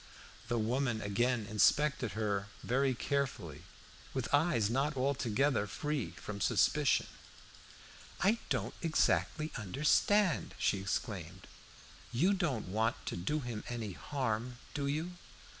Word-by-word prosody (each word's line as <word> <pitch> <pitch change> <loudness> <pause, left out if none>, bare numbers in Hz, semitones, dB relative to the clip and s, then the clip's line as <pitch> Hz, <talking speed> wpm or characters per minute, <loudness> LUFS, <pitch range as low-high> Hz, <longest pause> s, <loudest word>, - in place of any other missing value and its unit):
The 120 +1 0
woman 120 +1 0
again 110 +3 0
inspected 125 +4 +3
her 100 -2 -1 0.2
very 130 +1 +2
carefully, 120 - -2 0.5
with 130 -3 -1
eyes 145 -8 +3
not 135 +5 0
altogether 130 -3 +1
free 145 +4 -2
from 100 -1 -7
suspicion. - - +3 1.1
"I 210 +5 +3
don't - - -1
exactly 160 -1 +1
understand," 150 - +2
she 100 - +1
exclaimed. 95 -3 -4 0.7
"You 165 +12 +3
don't 155 - -1
want 110 +5 +1
to - - -3
do 100 - -1
him 120 -4 -5
any 115 -4 -3
harm, 120 - -2 0.2
do 140 -1 -1
you? 160 +5 -2
125 Hz, 115 wpm, -33 LUFS, 105-145 Hz, 1.1 s, inspected